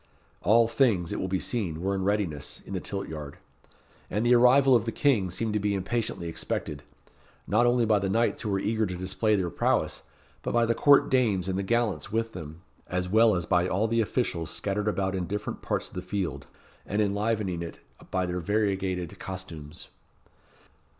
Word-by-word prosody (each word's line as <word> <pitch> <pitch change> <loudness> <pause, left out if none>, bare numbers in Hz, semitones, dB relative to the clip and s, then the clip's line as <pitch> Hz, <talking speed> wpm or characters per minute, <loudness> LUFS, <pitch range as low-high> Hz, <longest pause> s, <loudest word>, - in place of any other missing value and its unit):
All 115 +4 +5
things, 115 -8 +2
it - - -3
will 95 - -2
be 95 0 0
seen, 90 -7 -2
were 95 +3 -1
in 95 -1 -1
readiness, 95 -8 -1
in - - -8
the 95 - -1
tilt 100 +2 -4
yard, 75 -2 -7 0.7
and 105 +5 -1
the 120 - +5
arrival 130 +2 +6
of 115 -2 +2
the 115 - -1
King 115 -11 +2
seemed 110 +4 -2
to 105 - +1
be 100 0 0
impatiently 95 -2 -2
expected 80 - -3 0.6
not 120 +4 +3
only 120 -1 +3
by 105 -2 +3
the 95 0 -1
knights 115 +4 +1
who 110 - -3
were 100 - +1
eager 110 +2 0
to 90 -1 -5
display 95 +4 +1
their 90 -4 -1
prowess, - - 0 0.4
but - - -3
by 120 0 +4
the 115 - +2
court 140 +4 +5
dames 110 -8 +2
and 95 - -1
the - - +1
gallants 110 0 0
with 115 +1 -1
them, 80 0 -9 0.2
as 90 0 -2
well 110 +1 +5
as 90 -2 -1
by 90 +1 +2
all 100 +5 +1
the 115 +1 +2
officials 95 -8 -1
scattered 105 +3 -2
about 95 -2 0
in 90 -2 -2
different 105 +1 -4
parts - - -2
of - - -22
the 90 - -4
field, 95 -1 -4 0.4
and 105 - -2
enlivening 105 -3 0
it 85 - -7 0.3
by 90 0 0
their 90 0 -2
variegated 95 -2 -1
costumes. 85 -4 -8
100 Hz, 195 wpm, -27 LUFS, 90-115 Hz, 0.7 s, arrival